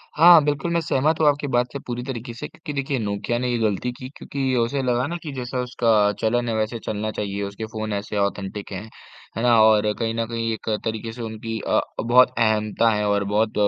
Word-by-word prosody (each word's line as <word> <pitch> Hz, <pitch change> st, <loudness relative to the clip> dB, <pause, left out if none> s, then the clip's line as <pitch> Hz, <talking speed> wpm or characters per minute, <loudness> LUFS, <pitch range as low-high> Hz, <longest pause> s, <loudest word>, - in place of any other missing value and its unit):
हाँ 165 Hz, 0 st, +8 dB
बिल्कुल, 150 Hz, +4 st, -1 dB
मैं 170 Hz, -, +3 dB
सहमत 155 Hz, +1 st, +1 dB
हूँ 155 Hz, -, +4 dB
आपकी 145 Hz, 0 st, +2 dB
बात 125 Hz, -2 st, +1 dB
से 140 Hz, -, -4 dB
पूरी 120 Hz, 0 st, -3 dB
तरीके 120 Hz, -2 st, -6 dB
से 115 Hz, -, -6 dB
क्योंकि 155 Hz, -2 st, -9 dB
देखिए 135 Hz, -2 st, -1 dB
नोकिया 100 Hz, +2 st, -2 dB
ने 125 Hz, -, -1 dB
ये 120 Hz, -, +1 dB
गलती 110 Hz, +3 st, 0 dB
की 130 Hz, 0 st, -8 dB
क्योंकि 135 Hz, -2 st, -2 dB
उसे 120 Hz, +4 st, 0 dB
लगा 125 Hz, 0 st, +1 dB
ना 175 Hz, -, -3 dB
कि 150 Hz, -, -5 dB
जैसा 125 Hz, -1 st, -4 dB
उसका 115 Hz, -4 st, +2 dB
चलन 120 Hz, +2 st, +1 dB
है 110 Hz, -, -1 dB
वैसे 110 Hz, +2 st, -1 dB
चलना 110 Hz, 0 st, -2 dB
चाहिए, 100 Hz, -1 st, -4 dB
उसके 100 Hz, +3 st, -5 dB
फ़ोन 110 Hz, -1 st, -3 dB
ऐसे 100 Hz, +1 st, -3 dB
ऑथेंटिक 100 Hz, 0 st, -2 dB
हैं, 100 Hz, +3 st, -6 dB, 0.5 s
है 115 Hz, -, -2 dB
ना? 120 Hz, -2 st, +5 dB
और 105 Hz, -1 st, +5 dB
कहीं 115 Hz, -1 st, -1 dB
न 115 Hz, -, 0 dB
कहीं 115 Hz, -1 st, -2 dB
एक 110 Hz, -, -6 dB, 0.2 s
तरीके 110 Hz, 0 st, -3 dB
से 120 Hz, +1 st, -9 dB
उनकी 110 Hz, 0 st, -5 dB
अ, -, -, +3 dB, 0.2 s
बहुत 125 Hz, +2 st, +5 dB
अहमता 110 Hz, 0 st, +2 dB
है 105 Hz, 0 st, 0 dB
और 100 Hz, 0 st, +2 dB
बहुत 105 Hz, +2 st, 0 dB
115 Hz, 225 wpm, -23 LUFS, 110-125 Hz, 0.5 s, हाँ